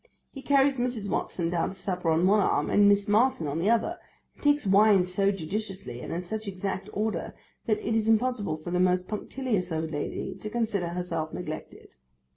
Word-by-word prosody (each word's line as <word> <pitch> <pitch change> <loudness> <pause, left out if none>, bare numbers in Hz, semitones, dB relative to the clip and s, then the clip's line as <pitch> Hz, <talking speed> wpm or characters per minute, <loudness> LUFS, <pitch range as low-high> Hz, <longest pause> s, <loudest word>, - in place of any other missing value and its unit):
He 270 - -9
carries 275 -1 +3
Mrs. 240 -4 -2
Watson 170 -2 -1
down 170 -2 0
to 195 - -8
supper 180 -3 -2
on 160 +2 +3
one 205 +3 +5
arm, 200 - +1
and 205 0 +6
Miss 200 +1 +3
Martin 215 -4 +3
on 145 +2 -2
the 190 +6 +1
other, 235 +10 +1 0.3
and - - -21
takes 290 -2 +3
wine 200 0 +5
so 185 +2 +1
judiciously, 190 - -4
and - - -6
in 170 +2 -3
such 215 +4 -5
exact 195 +1 -4
order, 210 -4 -2 0.3
that 215 -2 0
it 225 - +1
is 220 -1 +1
impossible 220 -7 +1
for 155 +3 -7
the 180 - +1
most 180 0 +2
punctilious 210 -3 -2
old 160 0 -2
lady 145 -2 -3
to 215 - -5
consider 215 -5 -1
herself 170 -2 -3
neglected. 155 -3 -7
200 Hz, 195 wpm, -27 LUFS, 175-220 Hz, 0.3 s, and